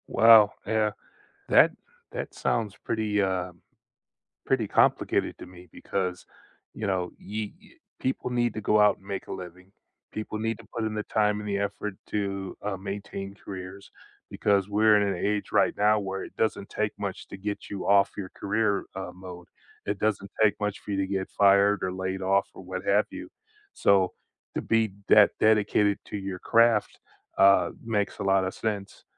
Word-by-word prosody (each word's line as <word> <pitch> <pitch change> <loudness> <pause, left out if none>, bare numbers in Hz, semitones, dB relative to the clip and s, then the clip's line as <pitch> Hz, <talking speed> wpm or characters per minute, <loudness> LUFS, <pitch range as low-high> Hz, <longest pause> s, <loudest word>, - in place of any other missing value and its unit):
Well, 110 -2 +7
yeah, 110 -1 +1 0.6
that - - +6 0.4
that - - -5
sounds 105 -4 -1
pretty, 105 -2 0
uh 95 -2 -1 0.9
pretty 125 -5 +1
complicated - - +2
to - - -9
me, 90 0 -14
because, 90 -2 -3 0.5
you 110 - -4
know, 90 -2 -1
you 105 0 -5
y 210 - -19 0.3
people 130 -1 -2
need 120 -2 0
to 110 - -4
go 105 +1 +3
out, 105 -1 +5
and 95 - -23
make 100 -1 -5
a - - -7
living, 90 0 -10 0.4
people 110 0 -5
need 115 0 -1
to 115 - -13
put 115 -2 -2
in 110 - -2
the 105 0 -2
time, 105 -1 +1
and 105 - -6
the 100 - 0
effort 100 +1 -3
to, 100 -2 -3
uh, 105 -2 -1
maintain 100 0 -6
careers, 95 -1 -9 0.4
because 100 -2 +1
we're 105 +1 +4
in 100 - +1
an 100 - -1
age 105 0 -1
right - - +3
now 105 +1 +4
where 95 -1 -4
it - - -11
doesn't 110 -3 -1
take 105 -1 -1
much 100 -2 -5
to - - -9
get 100 +1 -5
you 100 -2 -5
off 100 0 +5
your 95 -3 -5
career, 100 0 0
uh, 95 0 -5
mode, 90 -1 -10 0.4
it 100 -1 -2
doesn't 100 -2 -1
take 110 -1 +4
much 105 -1 -2
for 105 - -8
you 100 - -1
to 95 0 0
get 95 -1 -2
fired, 100 0 +4
or 95 - -1
laid 95 0 -3
off, 95 +1 +2
or - - -10
what 95 +1 -5
have 100 +1 +3
you, - - -8 0.4
so 95 -2 +3 0.4
to - - -1
be 115 -2 +1 0.2
that 105 -1 +8
dedicated 105 -1 +3
to - - -5
your 95 -2 -5
craft, 115 0 +3 0.4
uh, 100 0 +6 0.2
makes 105 -3 -1
a - - -2
lot 95 -1 +3
of 95 - -3
sense, 105 -2 -4
100 Hz, 185 wpm, -27 LUFS, 95-105 Hz, 0.9 s, that